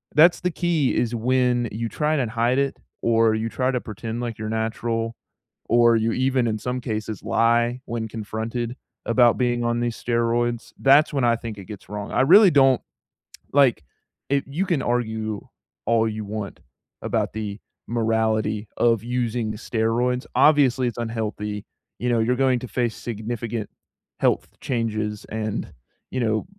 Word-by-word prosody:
that's 170 +4 +6
the 180 - +1
key, 165 -5 +1
is 120 -1 0
when 125 +1 +1
you 115 +2 -3
try 150 +4 0
and 125 -7 -1
hide 120 +3 +1
it 140 -1 0 0.2
or 115 -1 +3
you 110 +1 -2
try 130 +2 0
to 125 -2 -1
pretend 115 +2 -5
like 120 -2 -4
you're 110 - -4
natural 115 +1 -2 0.5
or 120 0 +5
you 115 +1 +1
even, 130 -1 +1
in 110 - 0
some 125 +4 -3
cases, 110 -3 -4
lie 120 +2 +2
when 115 -1 -3
confronted 115 +2 -4 0.3
about 120 0 +4
being 120 -1 +1
on 120 0 0
these 120 -1 -3
steroids, 120 0 0
that's 140 +3 +5
when 135 -3 +1
I 115 -1 +4
think 115 -2 -7
it 100 - -9
gets 105 -3 -10
wrong, 105 0 -5
I - - +2
really 190 +8 +8
don't 135 -3 +5 0.7
like, 130 - +4 0.5
i 140 -1 +2
you 160 +8 -1
can 170 -7 0
argue 110 -4 -2 0.4
all 115 -1 +3
you 110 -1 -5
want 100 -1 -5 0.4
about - - -1
the 105 -1 -5 0.3
morality 110 -2 0
of 115 -3 +3
using 120 -2 -1
the 105 - -6
steroids. 120 +3 0
Obviously, 135 -4 +4
it's 120 - -4
unhealthy, 105 -3 -3 0.3
you 125 - -1
know, 120 -1 +2
you're 120 +3 +2
going 130 -1 +2
to 125 - -7
face 120 -2 -1
significant 115 -1 -4 0.5
health - - +2
changes, 110 -4 -2
and, 110 -1 -3 0.4
you 130 - -2
know, 110 -3 0
115 Hz, 160 wpm, -23 LUFS, 110-125 Hz, 0.7 s, really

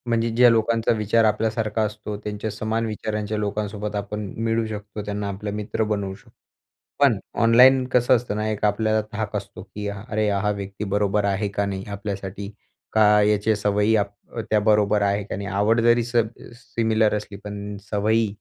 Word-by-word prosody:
म्हणजे 115 0 +1
ज्या 125 +1 +7
लोकांचा 115 0 +2
विचार 110 +2 +2
आपल्यासारखा 110 0 0
असतो 105 0 -5
त्यांच्या 105 +1 -4
समान 110 +2 -2
विचारांच्या 105 -1 -3
लोकांसोबत 105 0 -3
आपण 105 +1 -4 0.2
मिळू 115 0 +1
शकतो. 105 -1 -6
त्यांना 105 0 -3
आपले 100 +1 -5
मित्र 105 +2 -2
बनवू 100 -3 -2
शकतो, - - -20 0.7
पण 135 -7 +4 0.2
ऑनलाईन 125 +3 +6
कसं 125 0 +4
असतं 115 -3 -3
ना, 105 0 -1
एक 105 -1 -3
आपल्याला 110 +1 +2
धाक 105 0 -3
असतो, 100 -1 -7
की 105 +2 -7
अरे 105 +1 -2
हा 100 +1 0
व्यक्ती 100 0 -5
बरोबर 100 0 +1
आहे 100 +1 0
का 100 0 -1
नाही 95 -1 -4
आपल्यासाठी? 100 -1 -5 0.4
का 105 -1 +5
याच्या 105 +1 +2
सवयी 105 +1 +2
आप 100 -1 0 0.4
त्या 110 - +4
बरोबर 105 -1 +3
आहे 100 +1 +1
का - - -5
नाही? 100 - -5
आवड 105 +4 +2
जरी 120 0 +4
सब 120 -1 +1 0.3
सिमिलर 110 -3 0
असली, 105 -1 -5
पण 105 0 -6
सवयी 110 +2 +2
105 Hz, 170 wpm, -23 LUFS, 100-110 Hz, 0.7 s, ज्या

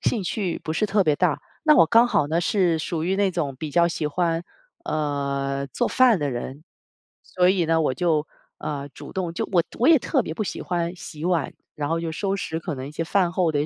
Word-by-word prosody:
兴 225 - 0
趣 185 -1 -2
不 160 - -2
是 215 +6 +1
特 200 -1 +2
别 150 -3 +3
大， 170 -1 0 0.2
那 305 - +7
我 - - +8
刚 230 +9 +5
好 205 -11 +2
呢 165 +2 +1
是 175 -3 +2
属 160 0 -3
于 190 +3 0
那 200 -1 +2
种 155 -6 -2
比 155 +3 -5
较 170 +3 +4
喜 165 -2 -2
欢， 165 +2 0 0.4
呃， 140 -2 -2
做 130 - -1
饭 250 -5 +4
的 145 -3 -1
人。 130 +4 -6 0.6
所 180 0 +2
以 185 -3 +1
呢 165 0 +2
我 150 - +1
就， 155 +1 +1 0.3
呃， 145 -2 -4
主 145 +1 -11
动 175 -3 -3
就 - - -2
我 175 -3 +4 0.2
我 245 - +2
也 325 -2 +7
特 265 +2 0
别 160 - -5
不 165 - -3
喜 - - -5
欢 175 -1 -2
洗 155 -3 -8
碗， 175 -3 0 0.2
然 145 -1 -3
后 165 0 0
就 165 -1 -3
收 195 +4 -1
拾 160 -3 -3
可 165 -1 -4
能 130 +1 -6
一 - - -10
些 160 - -3
饭 180 +1 +2
后 175 -3 +1
的 145 - 0
一 - - +2
165 Hz, 255 characters per minute, -24 LUFS, 150-185 Hz, 0.6 s, 我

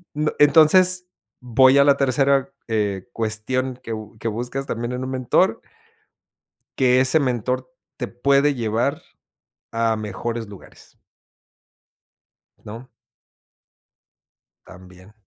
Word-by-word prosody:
n 150 +1 0
entonces, 180 +5 +5 0.3
voy 130 +2 +4
a 140 - +6
la 140 -1 +4
tercera, 135 0 +1 0.2
eh, 105 -2 -2
cuestión 115 +4 -2
que 115 - -7
bu 110 0 -8
que 115 - -5
buscas 120 +5 -4
también 120 -1 -4
en 125 +1 -4
un 130 - -5
mentor. 130 -2 +1 1.2
Que 125 -1 +4
ese 130 +5 +3
mentor, 125 - -2 0.3
te 125 - -4
puede 140 +4 +2
llevar 120 +4 -1 0.7
a 115 0 0
mejores 110 +2 -5
lugares. 100 -2 -15 1.7
¿No? 115 +4 -10 1.8
También. 90 +2 -16
125 Hz, 105 wpm, -21 LUFS, 110-135 Hz, 1.8 s, a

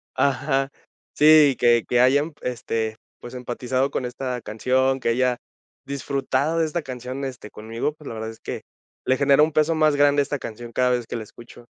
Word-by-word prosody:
ajá, 135 0 +1 0.4
sí, 150 -2 +6
que 120 -1 +4
que 125 - +2
hayan, 145 +5 +3
este, 115 -3 -3 0.2
pues, 120 +1 -10
empatizado 125 +2 -2
con 130 - -2
esta 125 0 -4
canción, 130 +5 0
que 115 - -1
haya 125 +1 +1 0.5
disfrutado 140 +2 -1
de 165 - +3
esta 170 +2 -2
canción, 130 0 -6
este, 125 -5 -8
conmigo, 115 +7 -4
pues, 150 -1 -14
la - - -6
verdad 110 0 -5
es 115 - -15
que, - - -6 0.5
le 130 - +3
genera 140 +1 +5
un 155 - +1
peso 155 +2 +2
más 155 -2 +3
grande 145 0 +4
esta 145 0 -4
canción 120 +1 -8
cada 125 +2 +2
vez 125 -1 0
que - - -6
la 115 - -3
escucho. 120 +2 -15
130 Hz, 190 wpm, -23 LUFS, 120-145 Hz, 0.5 s, sí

